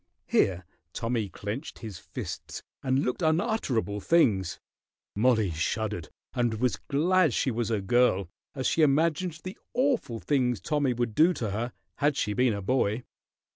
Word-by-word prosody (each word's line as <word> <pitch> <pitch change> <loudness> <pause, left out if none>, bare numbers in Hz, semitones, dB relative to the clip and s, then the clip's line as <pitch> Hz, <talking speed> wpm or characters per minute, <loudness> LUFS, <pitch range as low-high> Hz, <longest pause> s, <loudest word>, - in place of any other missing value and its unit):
Here 90 -3 +2 0.3
Tommy 115 -2 -1
clenched 105 - -6
his 110 -6 -8
fists - - -7 0.2
and 130 +1 +1
looked 125 - -2
unutterable 160 - +1
things. 105 - +2 0.6
Mollie 110 -3 +3
shuddered 90 +1 -2 0.2
and 120 -2 +1
was 125 +2 0
glad 165 0 +3
she 130 - +1
was 115 -1 -1
a 110 -3 0
girl 100 -3 +3 0.3
as 130 -2 -3
she 165 - +2
imagined 160 +3 +2
the 185 +1 -7 0.2
awful 250 - +1
things 125 -6 +1
Tommy 145 -4 0
would 120 -2 -1
do 165 +9 +5
to 115 - -3
her 115 +4 -2 0.3
had 145 -1 +2
she 105 - 0
been 125 0 +3
a 100 -1 -4
boy. 120 0 +1
125 Hz, 150 wpm, -28 LUFS, 105-150 Hz, 0.6 s, do